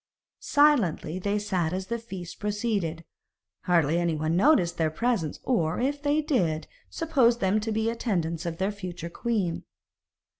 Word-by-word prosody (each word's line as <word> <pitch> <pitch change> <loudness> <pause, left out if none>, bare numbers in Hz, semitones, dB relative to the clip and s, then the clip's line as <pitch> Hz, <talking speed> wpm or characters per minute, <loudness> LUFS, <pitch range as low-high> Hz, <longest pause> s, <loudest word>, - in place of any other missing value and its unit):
Silently 235 - +2
they 200 +2 0
sat 185 -6 -1
as 185 0 -3
the 235 +3 -3
feast 190 -6 -8
proceeded; 205 -6 -2 0.6
hardly 170 -2 +3
anyone 160 -1 0
noticed 180 - +3
their 160 -1 +2
presence, 185 -2 -1
or, 170 -10 0
if 285 +3 -1
they 295 +1 +1
did, 175 - 0 0.2
supposed 265 -8 +2
them 195 +1 +2
to 220 +1 -3
be 220 +1 0
attendants 175 -8 -1
of 165 -1 -4
their 190 +3 0
future 180 -4 -7
queen. 205 -8 -1
190 Hz, 145 wpm, -27 LUFS, 170-235 Hz, 0.6 s, hardly